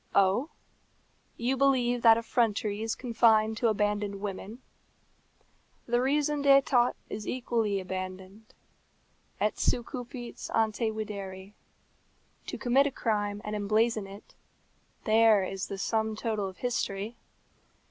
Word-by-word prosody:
Oh! 200 +9 +3 0.9
you 245 +3 0
believe 250 -3 +2
that 225 -1 +7
effrontery 220 -3 0
is 225 0 -2
confined 225 -3 +3
to 235 - +2
abandoned 205 -1 0
women? 205 +4 -6 1.2
The 240 +1 +1
raison 290 +2 +1
d'état 275 -3 +4
is 210 - -6
equally 230 -5 -1
abandoned. 185 +3 -7 0.8
Et 210 0 +1
se - - +2
cupit 245 0 -7
ante 220 0 +1
videri. 200 -3 -6 0.9
To - - -4
commit 265 +3 +3
a - - -3
crime 205 -4 -1
and 210 0 -3
emblazon 215 +1 +1
it, 200 +2 -13 0.7
there 220 -2 +5
is 190 0 -4
the 195 - -5
sum 220 +2 -1
total 215 -2 -2
of 185 - -14
history. 225 -3 -2
220 Hz, 115 wpm, -29 LUFS, 205-240 Hz, 1.2 s, that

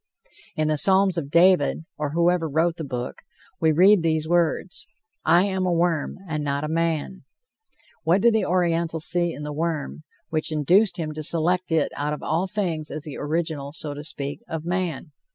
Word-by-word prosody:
In 155 0 0
the 155 -1 +1
Psalms 190 0 +4
of 155 -5 -3
David, 170 -2 +3
or 150 -1 -3
whoever 170 -1 +2
wrote 165 +3 +1
the 160 - -5
book, 125 -3 -5 0.4
we 160 -1 +3
read 185 +5 +5
these 160 -1 0
words: 175 +2 0 0.4
"I 170 +3 +5
am 190 -2 -1
a - - +1
worm, 170 -3 0
and 155 -2 -3
not 140 0 -1
a - - -1
man." 165 +3 -1 0.8
What 175 +5 +3
did 235 +1 +5
the 220 -2 +2
Oriental 170 -2 0
see 175 +2 +1
in 150 - -7
the 150 0 -5
worm, 155 -1 -3 0.3
which 160 0 -1
induced 180 +8 +3
him 160 -3 -3
to 155 - -5
select 170 +3 0
it 160 -2 +1
out 150 +1 -2
of 150 - -7
all 175 +4 0
things 175 -7 -2
as 150 0 -5
the 150 -3 -7
original, 150 -2 -3
so 150 -2 -3
to 145 +1 -8
speak, 145 -2 -5
of 160 -1 -5
man? 175 -3 -2
165 Hz, 190 wpm, -24 LUFS, 150-175 Hz, 0.8 s, read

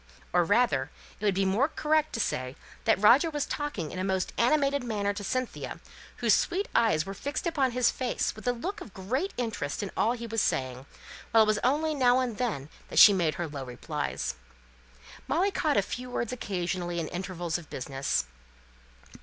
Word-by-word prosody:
Or, 175 0 +5
rather, 195 - +2 0.3
it 210 - -4
would 200 -2 +3
be 195 0 +2
more 210 +9 +3
correct 310 0 +1
to 230 - -2
say 130 - -2 0.3
that - - +3
Roger 250 - +6
was 295 -2 -2
talking 290 - -3
in 185 - -5
a - - -1
most 190 -1 -1
animated 280 +2 +2
manner 205 -4 -1
to 205 0 -6
Cynthia, 255 +4 -3 0.4
whose - - +3
sweet 385 +4 +1
eyes 180 -9 +3
were 195 - -5
fixed 285 - -4
upon 290 -6 +2
his 250 0 +2
face 255 -2 -2
with 215 +3 -9
a - - +5
look 360 - -5
of 210 - -11
great 255 - -2
interest 220 -11 -2
in 200 - -4
all 230 - +2
he 235 -1 -6
was 225 -1 0
saying, 130 0 -1 0.4
while 225 -1 +6
it - - +2
was 215 0 +2
only 305 +5 +2
now 250 -3 +4
and 245 -5 -2
then 210 - -2 0.3
she 205 - +10
made 170 -5 +1
her 175 - -3
low 145 -3 -6
replies. 125 - -3 0.9
Molly 380 +4 +2
caught 310 -6 +1
a 200 - +4
few 250 +5 -6
words 240 -1 -2
occasionally 175 -5 -2
in 160 - -2
intervals 175 -2 -3
of 165 - -14
business. 135 - -2
215 Hz, 190 wpm, -28 LUFS, 175-255 Hz, 0.9 s, she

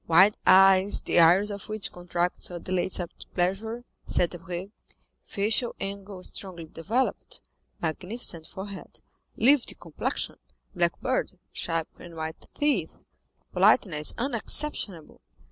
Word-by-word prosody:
"Wild 190 +6 +6
eyes, 195 +1 +7
the - - +2
iris 180 +5 +6
of 200 +1 -7
which 215 -1 -3
contracts 175 0 -2
or 175 - -5
dilates 185 +2 -1
at 175 -2 -4 0.2
pleasure," 215 +7 -1 0.2
said 175 - +2
Debray; 180 +2 -6 0.5
"facial 220 +4 0
angle 195 -1 -6
strongly 180 -4 -6
developed, 210 +12 -2 0.4
magnificent 170 0 -1
forehead, 195 0 -8 0.4
livid 270 +2 +3
complexion, - - -2 0.4
black 175 -2 +1
beard, 255 -7 -1 0.2
sharp 165 -1 -1
and 170 -1 -11
white 160 0 -6
teeth, 295 -1 0 0.6
politeness 150 -6 +3
unexceptionable." 235 - -2
190 Hz, 110 wpm, -27 LUFS, 175-210 Hz, 0.6 s, eyes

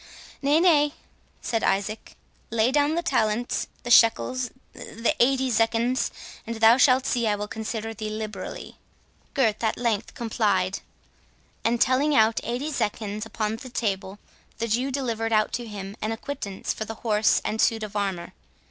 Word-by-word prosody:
"Nay, 290 +3 +3
nay!" 300 -4 +4 0.5
said 225 -2 -1
Isaac; 205 +3 -1 0.3
"lay 230 +2 +2
down 290 +2 +2
the 340 - -1
talents—the 240 -1 -1
shekels—the 240 0 +2
eighty 265 +1 +3
zecchins, 230 +3 +1 0.4
and 230 - -3
thou 225 +2 +6
shalt 260 0 +4
see 240 -4 +1
I 210 - +2
will 205 0 -4
consider 225 +1 -4
thee 215 0 -5
liberally." 215 0 -6 0.6
Gurth 225 -5 +1
at 220 - +1
length 230 -4 -1
complied; 205 -6 0 0.8
and 235 +1 +1
telling 280 +5 +3
out 220 -1 +4
eighty 250 +6 -3
zecchins 215 -4 -2
upon 220 0 -2
the 255 - -10
table, 195 -4 -2 0.4
the 230 - -2
Jew 245 +5 0
delivered 230 -4 -2
out 215 0 +2
to 240 -1 -3
him 200 -2 -7
an 215 - -1
acquittance 225 -4 -4
for - - -4
the 225 +1 -6
horse 215 -1 +3
and 220 - -1
suit 225 -1 +2
of 210 0 -7
armour. 195 -4 -2
225 Hz, 150 wpm, -25 LUFS, 215-255 Hz, 0.8 s, thou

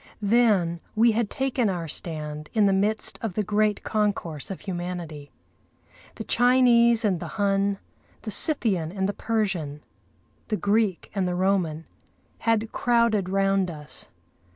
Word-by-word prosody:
Then 200 -6 +3 0.2
we 230 +2 +5
had 220 -1 -1
taken 265 -5 0
our 175 -3 -3
stand 150 -1 -4
in 215 -2 +4
the 195 - +3
midst 210 +3 0
of 220 -6 -4
the 215 - 0
great 210 +1 0
concourse 200 -8 -2
of 195 - -6
humanity. 175 -5 -6 0.9
The - - -6
Chinese 240 -2 +4
and 190 -5 +1
the - - -6
Hun, 200 -1 +1 0.5
the 215 - -4
Scythian 200 - +2
and 190 0 -1
the 205 - -2
Persian, 190 -10 -2 0.6
the 215 - -1
Greek 205 -2 0
and 195 -3 0
the 180 - -2
Roman, 180 -4 0 0.5
had 225 -1 0
crowded 235 -5 +1
round 195 -1 +1
us. 150 -3 -6
200 Hz, 140 wpm, -25 LUFS, 175-220 Hz, 0.9 s, we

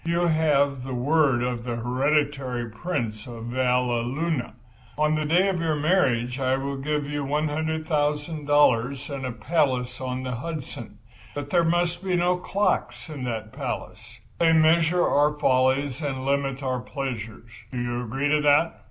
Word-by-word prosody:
You 170 +1 +1
have 145 -5 +2
the 130 -1 -4
word 135 -1 +2
of 125 -1 -2
the 120 -1 -3
hereditary 130 0 0
Prince 115 -6 -4
of 115 -2 -8
Valleluna. 125 +4 0 0.4
On 150 0 +2
the 155 0 0
day 175 +6 +3
of 190 -3 0
your 160 -2 +1
marriage 135 -6 +1
I 130 0 +1
will 140 +1 -3
give 150 +1 -1
you 145 0 -3
$100,000 150 -3 +1
and 135 -1 -4
a - - -3
palace 125 0 -1
on 130 0 -3
the 130 - -3
Hudson. 155 +1 -7 0.4
But 145 0 -5
there 175 -2 +4
must 175 +1 0
be 185 -2 0
no 180 +1 +2
clocks 195 -1 -1
in 140 -5 -5
that 110 -2 -4
palace—they 165 -1 -3
measure 165 +2 +4
our 150 +1 +2
follies 130 0 +2
and 135 -3 -3
limit 140 -1 -1
our 130 -1 -1
pleasures. 120 -4 -6 0.2
Do 125 - -5
you 120 0 -2
agree 135 +5 -1
to 150 0 +3
that?" 150 +3 +3
140 Hz, 150 wpm, -25 LUFS, 125-155 Hz, 0.4 s, there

